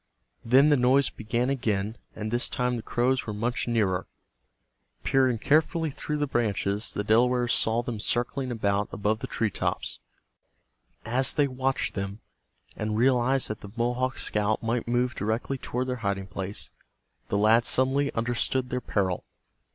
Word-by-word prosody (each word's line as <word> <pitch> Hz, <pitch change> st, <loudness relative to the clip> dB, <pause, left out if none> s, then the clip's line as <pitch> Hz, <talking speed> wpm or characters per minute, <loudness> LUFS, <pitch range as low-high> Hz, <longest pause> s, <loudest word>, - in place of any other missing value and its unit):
Then 135 Hz, +5 st, +5 dB
the 145 Hz, -, +5 dB
noise 130 Hz, +3 st, +4 dB
began 120 Hz, +4 st, -1 dB
again, 110 Hz, -5 st, -1 dB, 0.2 s
and 110 Hz, 0 st, -4 dB
this 120 Hz, +1 st, +1 dB
time 125 Hz, -2 st, 0 dB
the 115 Hz, -, -4 dB
crows 125 Hz, +3 st, 0 dB
were 105 Hz, -, -3 dB
much 120 Hz, +4 st, -1 dB
nearer. 105 Hz, -6 st, +1 dB, 1.0 s
Peering 130 Hz, -3 st, +3 dB
carefully 155 Hz, +5 st, +2 dB
through 150 Hz, +2 st, -3 dB
the 145 Hz, -, +1 dB
branches, 105 Hz, -5 st, -1 dB
the 105 Hz, -, -2 dB
Delawares 120 Hz, +3 st, +3 dB
saw 115 Hz, +2 st, +2 dB
them 120 Hz, -4 st, -4 dB
circling 125 Hz, +4 st, -1 dB
about 100 Hz, -3 st, 0 dB
above 105 Hz, +1 st, 0 dB
the -, -, -5 dB
tree 110 Hz, -3 st, -1 dB
tops. -, -, -2 dB, 1.1 s
As 125 Hz, +4 st, +3 dB
they 145 Hz, -1 st, +2 dB
watched 130 Hz, 0 st, -1 dB
them, 100 Hz, +1 st, -4 dB, 0.6 s
and 105 Hz, 0 st, -2 dB
realized 130 Hz, +2 st, +3 dB
that 110 Hz, -, -5 dB
the 100 Hz, -, -9 dB
Mohawk 125 Hz, +2 st, 0 dB
scout 105 Hz, +1 st, 0 dB
might 115 Hz, +1 st, -1 dB
move 120 Hz, +1 st, +1 dB
directly 115 Hz, +5 st, -2 dB
toward 125 Hz, +1 st, -2 dB
their 125 Hz, -1 st, -2 dB
hiding 100 Hz, -3 st, -2 dB
place, 95 Hz, +1 st, -5 dB, 0.6 s
the 100 Hz, -, 0 dB
lads 110 Hz, +3 st, +4 dB
suddenly 135 Hz, +2 st, +2 dB
understood 120 Hz, +2 st, 0 dB
their 125 Hz, 0 st, -1 dB
peril. 95 Hz, -6 st, -1 dB
120 Hz, 155 wpm, -27 LUFS, 105-130 Hz, 1.1 s, Then